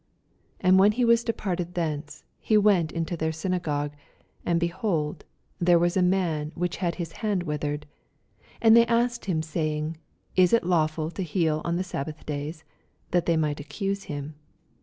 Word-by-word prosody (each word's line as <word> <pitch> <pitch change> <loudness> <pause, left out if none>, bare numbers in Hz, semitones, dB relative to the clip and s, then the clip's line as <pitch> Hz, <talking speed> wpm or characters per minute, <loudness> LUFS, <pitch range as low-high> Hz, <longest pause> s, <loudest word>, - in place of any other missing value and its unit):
9 - - +1
And 190 - +7
when 200 +2 +6
he 245 +2 +1
was 235 0 +4
departed 180 -6 -3
thence, 155 -3 -3 0.2
ho 215 - +5
went 190 -6 +3
into 165 +1 -2
their 160 -1 -1
synagogue: 160 -3 -2 0.5
10 175 - +1
And, 170 - +3
behold, 170 -3 -1 0.3
there 175 0 +5
was 175 +1 +2
a 190 - +3
man 175 -5 +1
which 175 0 -2
had 175 -3 -1
his 170 -3 -5
hand 205 -3 -1
withered. 150 -2 -3 0.8
And 225 0 +8
they 235 0 +6
asked 235 0 +1
him, 170 -5 0
sayine, 155 -1 -2 0.4
Is 185 +1 +5
it 230 - +4
lawftd 160 -2 0
to - - -4
heal 160 -3 0
on 170 - -1
the 180 - 0
sabbath 155 -3 -6
days? 150 +2 -4 0.5
that 175 -1 +1
they 165 -1 +3
might 150 -2 0
accuse 195 +7 -3
him. 145 0 -5
170 Hz, 175 wpm, -26 LUFS, 155-190 Hz, 0.8 s, And